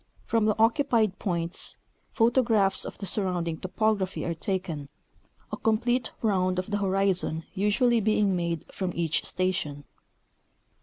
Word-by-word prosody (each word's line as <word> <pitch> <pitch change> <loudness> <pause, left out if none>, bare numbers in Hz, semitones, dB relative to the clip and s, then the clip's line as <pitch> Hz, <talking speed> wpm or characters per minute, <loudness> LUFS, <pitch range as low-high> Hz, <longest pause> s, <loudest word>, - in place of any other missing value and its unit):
From 225 -2 +2
the 215 0 +2
occupied 225 -3 +2
points, 170 -2 -3 0.3
photographs 225 -4 +2
of - - -7
the 200 - -5
surrounding 180 -4 -1
topograj^hy 195 -1 -1
are 170 - 0
taken, 165 -5 -3 0.6
a - - -3
complete 240 +3 +1
round 185 -4 +2
of 185 +3 -3
the 205 - 0
horizon 190 -4 +1
usually 230 +5 +2
being 210 -2 +2
made 170 -2 -2
from 185 -2 -3
each 165 -2 0
station. 175 -6 -1
195 Hz, 125 wpm, -27 LUFS, 175-220 Hz, 0.6 s, From